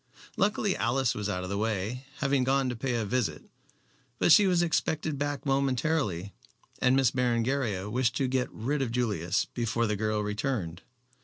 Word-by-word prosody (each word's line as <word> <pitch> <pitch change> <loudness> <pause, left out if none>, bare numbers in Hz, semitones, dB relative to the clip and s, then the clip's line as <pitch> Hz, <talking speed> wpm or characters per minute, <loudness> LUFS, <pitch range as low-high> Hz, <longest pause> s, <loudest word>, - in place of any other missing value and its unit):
Luckily 205 0 +1
Alice 125 +1 +1
was 105 -1 -3
out 90 -2 -2
of 90 - -5
the 100 - -1
way, 110 +4 -2
having 135 -2 +2
gone 135 0 +2
to 125 - -3
pay 125 +1 -2
a 115 -2 -1
visit. 125 +1 -1 0.7
But - - +3
she 205 +4 +7
was 175 -2 +3
expected 160 -3 -1
back 145 0 -2
momentarily, 135 - 0 0.5
and 130 0 +3
Miss 135 -3 +3
Berengaria 120 -5 0
wished 120 +1 0
to 135 - +1
get 130 -1 0
rid 140 +6 -2
of 125 -4 -1
Julius 105 -9 0
before 115 0 0
the 105 -1 0
girl 110 0 -1
returned. 105 -5 -3
125 Hz, 170 wpm, -28 LUFS, 105-135 Hz, 0.7 s, she